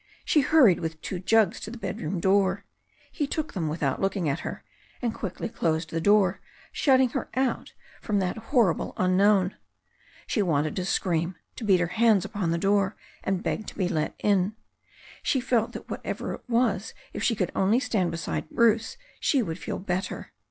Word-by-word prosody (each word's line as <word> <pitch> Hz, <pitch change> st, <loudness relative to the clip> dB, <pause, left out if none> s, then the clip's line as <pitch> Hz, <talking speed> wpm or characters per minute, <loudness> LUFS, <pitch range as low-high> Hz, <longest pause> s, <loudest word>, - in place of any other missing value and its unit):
She 300 Hz, -, +4 dB
hurried 260 Hz, -, +5 dB
with 160 Hz, -1 st, -4 dB
two 185 Hz, -, -4 dB
jugs 220 Hz, +2 st, +3 dB
to -, -, -7 dB
the 240 Hz, -, -8 dB
bedroom 195 Hz, -4 st, -3 dB
door. 195 Hz, +1 st, +2 dB, 0.5 s
He 290 Hz, -, -2 dB
took 315 Hz, +2 st, -3 dB
them 170 Hz, -5 st, -2 dB
without 150 Hz, -3 st, -1 dB
looking 195 Hz, -3 st, 0 dB
at 145 Hz, +3 st, 0 dB
her, -, -, -6 dB, 0.4 s
and 235 Hz, -3 st, -1 dB
quickly 195 Hz, -2 st, -4 dB
closed 160 Hz, -6 st, -1 dB
the 165 Hz, -, -1 dB
door, 200 Hz, -1 st, +3 dB, 0.3 s
shutting 260 Hz, -3 st, +4 dB
her 270 Hz, -, -4 dB
out 260 Hz, -1 st, -1 dB, 0.3 s
from 210 Hz, -2 st, 0 dB
that 185 Hz, -2 st, 0 dB
hor 235 Hz, -, +4 dB
rible -, -, -5 dB
unknown. 185 Hz, +1 st, +3 dB, 0.7 s
She 215 Hz, -, 0 dB
wanted 155 Hz, -5 st, +1 dB
to 185 Hz, -, -1 dB
scream, 175 Hz, -2 st, 0 dB, 0.2 s
to -, -, -7 dB
beat 195 Hz, -4 st, +4 dB
her 175 Hz, -, +2 dB
hands 215 Hz, +1 st, +3 dB
upon 195 Hz, -5 st, -2 dB
the 165 Hz, -, +1 dB
door 195 Hz, +2 st, +2 dB, 0.3 s
and 190 Hz, -2 st, -1 dB
beg 215 Hz, -, -2 dB
to -, -, -8 dB
be 185 Hz, -3 st, +1 dB
let 155 Hz, -3 st, -1 dB
in. 200 Hz, 0 st, +1 dB, 0.7 s
She 270 Hz, -, +1 dB
felt 240 Hz, -3 st, +1 dB
that -, -, -8 dB
whatever -, -, -4 dB
it -, -, -11 dB
was 230 Hz, -4 st, +1 dB, 0.2 s
if -, -, -5 dB
she 230 Hz, -, +2 dB
could 185 Hz, -3 st, -1 dB
only 205 Hz, +6 st, +3 dB
stand 220 Hz, -9 st, 0 dB
beside 165 Hz, -1 st, -4 dB
Bruce 230 Hz, -, +2 dB, 0.2 s
she 270 Hz, -5 st, +2 dB
would 165 Hz, -3 st, -5 dB
feel -, -, -4 dB
l)etter. 185 Hz, 0 st, -3 dB
195 Hz, 185 wpm, -26 LUFS, 175-225 Hz, 0.7 s, hurried